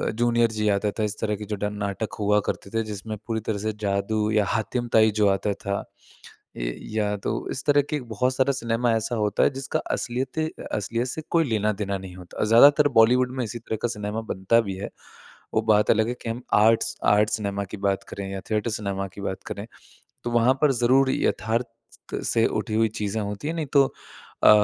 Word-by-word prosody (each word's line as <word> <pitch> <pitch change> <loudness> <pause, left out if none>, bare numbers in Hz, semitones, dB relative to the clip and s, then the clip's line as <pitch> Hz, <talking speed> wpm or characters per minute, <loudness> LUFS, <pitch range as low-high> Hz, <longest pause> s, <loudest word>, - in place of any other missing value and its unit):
Junior 120 0 +3
जी 105 -1 -1
आता 105 +1 +1
था। 110 - +2
इस 105 0 -3
तरह 105 -1 0
के 105 +1 -7
जो 105 - -3
डन 105 +1 -3
नाटक 100 +2 -3
हुआ 105 0 +3
करते - - -4
थे 115 - +1
जिसमें 110 0 -6
पूरी 115 -1 -1
तरह 110 -1 -2
से 110 +2 -2
जादू 105 +2 0
या 105 -2 +3
हातिमताई 110 0 +2
जो 105 - +5
आता 100 +1 0
था, 100 0 -3 0.7
ये - - -2 0.2
या 105 -1 +1
तो - - -3 0.2
इस - - -4
तरह 145 -1 +5
के 150 - -1
बहुत 125 +2 -1
सारा 135 +1 +3
सिनेमा 115 0 0
ऐसा 115 +2 -1
होता 105 -2 +1
है - - +5
जिसका 135 0 -2
असलियते 130 +6 -2 0.3
असलियत 115 +4 -1
से 160 - -4
कोई 165 -1 +4
लेना-देना 105 -2 0
नहीं 95 -1 -10
होता 90 -1 -12
और - - +2
ज़्यादातर 145 +6 +7
बॉलीवुड 125 +3 +5
में 125 - 0
इसी 115 +2 -5
तरह 110 -1 -4
का 120 - +1
सिनेमा 105 0 -4
बनता 95 +5 +3
भी 100 -4 -5
है। 100 - -5 0.6
वो 110 - +3
बात 105 -1 +4
अलग 110 0 +2
है 120 - -1
कि 115 - -4
हम 115 +2 -4
आर्ट्स 115 +2 +4
आर्ट् 105 +1 +4
सिनेमा 100 -2 -2
की - - -3
बात 95 0 0
करें 100 -1 -5
या 95 - -4
थिएटर 110 +1 0
सिनेमा 100 -2 -3
की 100 - -8
बात 95 -1 -4
करें, - - -5 0.6
तो 120 - -3
वहाँ 120 +2 +4
पर 150 -2 +5
ज़रूर 130 +2 +3
यथार्थ 115 +1 0 0.6
से 115 0 +2
उठी 110 0 -3
हुई 110 0 +4
चीज़ें 105 +1 -1
होती 105 +6 -4
हैं। 165 - -2
नहीं 160 -2 -2
तो 140 -1 +6 0.6
अ, - - +8
110 Hz, 210 wpm, -25 LUFS, 105-120 Hz, 0.7 s, अ